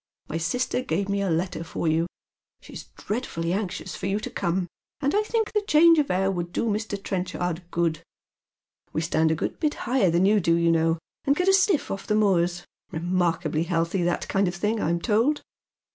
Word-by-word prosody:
My 165 Hz, -, -2 dB
sister 250 Hz, +9 st, -1 dB
gave 200 Hz, -5 st, -2 dB
me 200 Hz, 0 st, 0 dB
a 195 Hz, -, 0 dB
letter 170 Hz, +1 st, -1 dB
for 165 Hz, 0 st, -3 dB
you. 160 Hz, +2 st, +2 dB, 0.5 s
She's -, -, -10 dB
dreadfully 180 Hz, -7 st, -3 dB
anxious 195 Hz, -2 st, -3 dB
for -, -, -4 dB
you 200 Hz, +2 st, 0 dB
to -, -, -5 dB
come, 175 Hz, +2 st, -1 dB, 0.3 s
and 285 Hz, 0 st, 0 dB
I 415 Hz, -, +3 dB
think 445 Hz, 0 st, -1 dB
the 420 Hz, -, +2 dB
change 330 Hz, -3 st, +5 dB
of 290 Hz, -, +1 dB
air 190 Hz, +1 st, +1 dB
would 175 Hz, -2 st, -3 dB
do -, -, -1 dB
Mr. 215 Hz, -1 st, -1 dB
Trenchard 180 Hz, -2 st, -3 dB
good. 170 Hz, -3 st, 0 dB, 0.9 s
We 155 Hz, -, 0 dB
stand 160 Hz, -1 st, +2 dB
a 160 Hz, -, +2 dB
good -, -, -3 dB
bit 305 Hz, -2 st, 0 dB
higher 245 Hz, -6 st, +3 dB
than 170 Hz, +3 st, +3 dB
you 210 Hz, +1 st, +4 dB
do, 165 Hz, -2 st, +2 dB
you 170 Hz, 0 st, +3 dB
know, 165 Hz, 0 st, +2 dB, 0.3 s
and 280 Hz, -, +3 dB
get 360 Hz, +4 st, 0 dB
a -, -, +5 dB
sniff 385 Hz, -4 st, +3 dB
off 195 Hz, 0 st, -5 dB
the 210 Hz, -, +2 dB
moors 175 Hz, -4 st, +2 dB
— -, -, -44 dB
remarkably 170 Hz, -2 st, 0 dB
healthy, 170 Hz, +2 st, 0 dB
that 175 Hz, 0 st, 0 dB
kind 195 Hz, 0 st, +1 dB
of 175 Hz, -, -2 dB
thing, 210 Hz, +5 st, -1 dB
I'm 170 Hz, +1 st, +1 dB
told. 230 Hz, -, +1 dB
185 Hz, 205 wpm, -25 LUFS, 170-220 Hz, 0.9 s, change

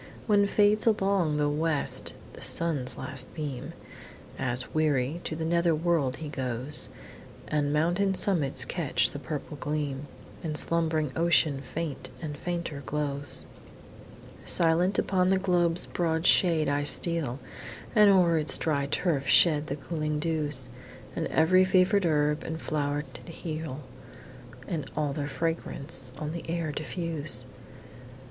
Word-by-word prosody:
When 205 Hz, -2 st, +3 dB
fades 210 Hz, +2 st, +3 dB
along 195 Hz, -7 st, +2 dB
the 150 Hz, 0 st, +2 dB
West 150 Hz, 0 st, 0 dB, 0.2 s
the -, -, -12 dB
Sun's 155 Hz, -7 st, +2 dB
last 130 Hz, 0 st, -7 dB
beam, 145 Hz, -6 st, -5 dB, 0.7 s
As, 125 Hz, 0 st, -3 dB
weary, 150 Hz, 0 st, 0 dB
to 160 Hz, -, -3 dB
the 160 Hz, 0 st, -3 dB
nether 170 Hz, 0 st, +2 dB
world 155 Hz, -5 st, 0 dB
he 155 Hz, -, -7 dB
goes, 130 Hz, 0 st, +1 dB, 0.6 s
And 145 Hz, -1 st, 0 dB
mountain 175 Hz, +6 st, +1 dB
summits 165 Hz, -9 st, +1 dB
catch 165 Hz, -6 st, 0 dB
the 145 Hz, -, -6 dB
purple 145 Hz, +2 st, -6 dB
gleam, 145 Hz, -1 st, -3 dB, 0.4 s
And 155 Hz, -2 st, -1 dB
slumbering 160 Hz, -3 st, 0 dB
ocean 165 Hz, -4 st, +3 dB
faint 150 Hz, +1 st, -5 dB
and 150 Hz, 0 st, -5 dB
fainter 170 Hz, -2 st, -4 dB
glows, 145 Hz, 0 st, -3 dB, 1.0 s
Silent 175 Hz, +3 st, +2 dB
upon 185 Hz, -1 st, +2 dB
the 190 Hz, -, +3 dB
globe's 175 Hz, -2 st, +2 dB
broad 165 Hz, -1 st, -1 dB
shade 165 Hz, -5 st, +4 dB
I 145 Hz, +1 st, 0 dB
steal, 150 Hz, -4 st, +1 dB, 0.6 s
And 210 Hz, -3 st, +6 dB
o'er 175 Hz, -4 st, +4 dB
its 150 Hz, -, +3 dB
dry 140 Hz, -3 st, 0 dB
turf 145 Hz, -1 st, -1 dB
shed 155 Hz, -3 st, +4 dB
the 140 Hz, -, -3 dB
cooling 150 Hz, 0 st, -3 dB
dews, 155 Hz, -1 st, -1 dB, 0.5 s
And -, -, -2 dB
ev'ry 185 Hz, +4 st, +4 dB
fever'd 185 Hz, +1 st, +3 dB
herb 150 Hz, -1 st, +1 dB
and 160 Hz, 0 st, -5 dB
flow'ret 145 Hz, -4 st, -3 dB
heal, 160 Hz, -4 st, -6 dB, 0.9 s
And 155 Hz, -6 st, -4 dB
all 150 Hz, -2 st, 0 dB
their 145 Hz, 0 st, -3 dB
fragrance 145 Hz, -5 st, 0 dB
on 150 Hz, 0 st, -4 dB
the 165 Hz, 0 st, -7 dB
air 165 Hz, -2 st, -2 dB
diffuse. 155 Hz, +2 st, -2 dB
155 Hz, 135 wpm, -28 LUFS, 145-170 Hz, 1.0 s, And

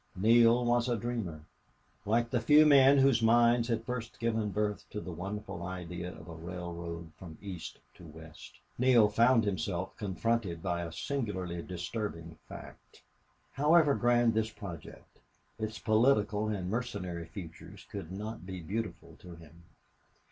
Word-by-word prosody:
Neale 115 Hz, +4 st, +5 dB
was 120 Hz, +1 st, +2 dB
a 120 Hz, -, +1 dB
dreamer, 105 Hz, -9 st, -4 dB, 0.7 s
like 115 Hz, +2 st, +1 dB
the 120 Hz, -, +1 dB
few 150 Hz, +3 st, +6 dB
men 140 Hz, -1 st, +7 dB
whose 135 Hz, -3 st, +4 dB
minds 120 Hz, +1 st, +4 dB
had 115 Hz, -2 st, -1 dB
first 120 Hz, -2 st, -5 dB
given 110 Hz, -2 st, 0 dB
birth 105 Hz, 0 st, -2 dB
to 105 Hz, -, -5 dB
the 90 Hz, -, -7 dB
wonderful 100 Hz, +2 st, -6 dB
idea 90 Hz, -1 st, -5 dB
of -, -, -13 dB
a 85 Hz, -, -8 dB
railroad 85 Hz, -1 st, -7 dB
from 85 Hz, -4 st, -10 dB
East 95 Hz, -5 st, -7 dB, 0.2 s
to 85 Hz, -, -14 dB
West. 80 Hz, -4 st, -13 dB, 0.2 s
Neale 120 Hz, -4 st, +5 dB
found 115 Hz, +2 st, +4 dB
himself 95 Hz, -2 st, -2 dB
confronted 100 Hz, -3 st, -2 dB
by 85 Hz, -2 st, -1 dB
a 85 Hz, -1 st, -5 dB
singularly 95 Hz, -, -3 dB
disturbing 85 Hz, -2 st, -5 dB
fact. -, -, -12 dB, 0.5 s
However 150 Hz, +1 st, +4 dB
grand 120 Hz, -2 st, +3 dB
this 110 Hz, 0 st, 0 dB
project, 90 Hz, -9 st, -10 dB, 0.4 s
its 110 Hz, 0 st, -4 dB
political 110 Hz, -2 st, +2 dB
and 95 Hz, -4 st, -3 dB
mercenary 95 Hz, -7 st, -4 dB
features 85 Hz, -3 st, -10 dB
could 95 Hz, -4 st, -6 dB
not 105 Hz, +2 st, -6 dB
be 95 Hz, 0 st, -6 dB
beautiful 85 Hz, -3 st, -5 dB
to 90 Hz, -2 st, -11 dB
him. 85 Hz, +1 st, -16 dB
105 Hz, 145 wpm, -31 LUFS, 85-115 Hz, 0.7 s, men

